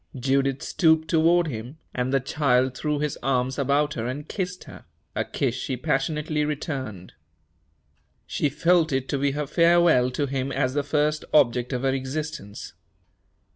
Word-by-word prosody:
Judith 135 +1 +1
stooped 160 -2 +2
toward 170 +2 +4
him, 125 0 -6 0.2
and 125 +1 -1
the 135 - +3
child 130 -2 +1
threw 150 +2 -1
his 150 -1 -2
arms 130 0 0
about 145 +2 +1
her 115 -3 -3
and 145 +4 -5
kissed 185 -2 -4
her - - -13 0.3
a - - 0
kiss 130 -4 -1
she 130 0 -3
passionately 150 +2 -1
returned. 135 - -4 1.1
She 145 - -1
felt 165 +2 +2
it 135 -1 -1
to 140 - -1
be 140 0 +1
her 150 +1 -2
farewell 170 -4 +4
to 140 +3 -1
him 135 0 -2
as 130 -1 0
the 145 - +1
first 150 +1 0
object 125 -4 +3
of 125 -1 -2
her 135 -1 +2
existence. 135 -5 -5
140 Hz, 160 wpm, -25 LUFS, 130-155 Hz, 1.1 s, toward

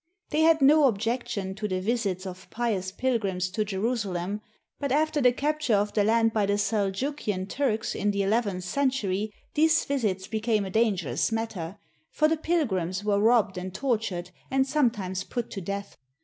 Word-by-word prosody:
They 305 +1 +2
had 320 -2 +5
no 295 +2 +7
objection 225 -3 -2
to 210 +2 -3
the 185 -2 -1
visits 200 -3 -1
of 185 0 -8
pious 210 -6 -1
pil 255 +3 0
grims 185 -3 -2
to 215 - +1
Jerusalem; 205 -2 -2 0.4
but 280 -2 -2
after 305 +1 +2
the 250 -1 +6
capture 290 -2 0
of 205 +1 0
the 210 - +3
land 225 +1 +3
by 210 -2 +1
the 205 0 +2
Seljukian 205 0 -1
Turks 235 -2 -1
in 205 - 0
the 200 -1 +1
eleventh 200 -3 0
century, 215 -3 0 0.2
these 320 +2 +3
visits 210 -9 -1
became 220 -1 0
a 190 - -6
dangerous 185 - +1
matter, 210 -5 -3 0.3
for 310 - +2
the 320 - +2
pilgrims 205 - 0
were 205 -1 +2
robbed 215 -4 +3
and 185 +1 -6
tor 250 -5 +1
tured 180 -5 -5 0.2
and 265 0 +2
sometimes 225 -10 0
put 240 +3 -4
to 195 - -5
death. 200 +2 -5
215 Hz, 175 wpm, -27 LUFS, 190-250 Hz, 0.4 s, no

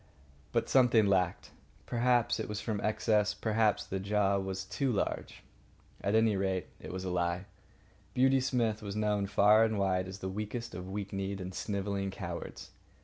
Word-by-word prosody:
But 115 - +1
something 120 -4 +5
lacked. 95 -3 +1 0.3
Perhaps 120 -1 +2
it 110 - -4
was 105 0 -3
from 105 -2 -3
excess. 105 -1 +1
Perhaps 110 0 +1
the 95 - -3
jaw 100 0 +1
was 95 0 -4
too 125 +7 -1
large. 105 - -3 0.6
At 100 +2 +1
any 110 -1 +4
rate, 95 -1 0
it - - -8
was 95 0 -5
a 95 - -3
lie. 85 +1 -1 0.7
Beauty 130 +1 +4
Smith 120 -5 0
was 100 -1 -5
known 105 -2 0
far 105 +2 +5
and 110 -1 +1
wide 95 -1 +1
as 95 0 -7
the 95 - -5
weakest 105 +4 -4
of 90 0 -6
weak 100 0 -5
kneed 95 0 -3
and 95 0 -6
snivelling 100 0 -2
cowards. 85 -3 -7
100 Hz, 170 wpm, -31 LUFS, 95-110 Hz, 0.7 s, something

